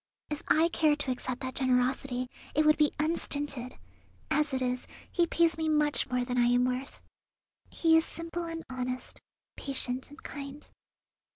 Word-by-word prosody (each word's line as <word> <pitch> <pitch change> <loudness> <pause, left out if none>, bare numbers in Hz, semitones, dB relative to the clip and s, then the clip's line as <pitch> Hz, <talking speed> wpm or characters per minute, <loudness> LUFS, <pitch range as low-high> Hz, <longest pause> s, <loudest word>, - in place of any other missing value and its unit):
If 300 +1 -3
I 320 +2 +5
cared 305 -3 +3
to 260 - -1
accept 255 0 -4
that 260 -1 -4
generosity 255 0 +1 0.3
it 305 +1 +4
would 305 0 +5
be 300 -1 +4
unstinted. 285 -5 0 0.5
As 300 -1 +2
it 265 - 0
is, 250 -1 -2 0.2
he 345 -1 +2
pays 330 -1 +2
me 320 0 0
much 300 -1 +3
more 250 -1 0
than 250 0 -1
I 240 - +4
am 245 +1 +4
worth. 255 +2 -3 0.7
He 325 -1 +3
is 325 - +5
simple 335 +1 -5
and 330 -1 -5
honest, 255 0 -4 0.3
patient 260 -2 -2
and 290 - -14
kind. 280 0 -7
275 Hz, 165 wpm, -30 LUFS, 255-310 Hz, 0.7 s, I